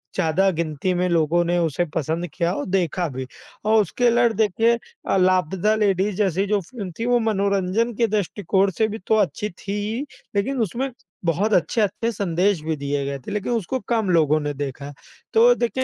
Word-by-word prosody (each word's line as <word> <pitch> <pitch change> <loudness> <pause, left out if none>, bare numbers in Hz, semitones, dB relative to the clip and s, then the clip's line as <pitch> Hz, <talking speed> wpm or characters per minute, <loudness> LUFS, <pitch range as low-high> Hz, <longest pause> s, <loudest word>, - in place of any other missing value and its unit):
ज़्यादा 190 +2 +2
गिनती 165 +1 -2
में 180 +1 +1
लोगों 170 +1 +2
ने 175 +1 +1
उसे 165 +1 0
पसंद 165 +4 -1
किया 170 -1 0
और 145 - -3
देखा 180 -2 0
भी। 130 0 -5 0.4
और 220 0 +5
उसके 240 +6 0
उलट 235 -1 +3
देखिए 225 +2 +3 0.4
अ, - - +3
लापता 185 +3 +2
लेडीज़ 200 -2 +1
जैसी 195 -1 +1
जो 210 0 +2
फ़िल्म 195 -1 -7
थी, 230 - -1
वो 245 0 +3
मनोरंजन 200 +1 0
के 230 0 +2
दृष्टिकोण 200 -1 +1
से 220 - +3
भी 220 +1 -5
तो 220 - +4
अच्छी 205 +2 0
थी 195 +3 -7
ही, 230 +5 -2 0.3
लेकिन 250 +6 0
उसमें 240 +7 -1 0.4
बहुत 195 +6 +1
अच्छे-अच्छे 210 - +1
संदेश 190 -2 0
भी 160 0 -1
दिए 140 0 -2
गए 140 0 -3
थे, 130 - -9
लेकिन 210 +3 -2
उसको 235 +3 -1
कम 220 -5 +1
लोगों 155 -3 +3
ने 145 0 -2
देखा। 140 0 -5 0.4
तो 470 +2 +6
देखें 250 +2 -1
190 Hz, 185 wpm, -22 LUFS, 170-220 Hz, 0.4 s, तो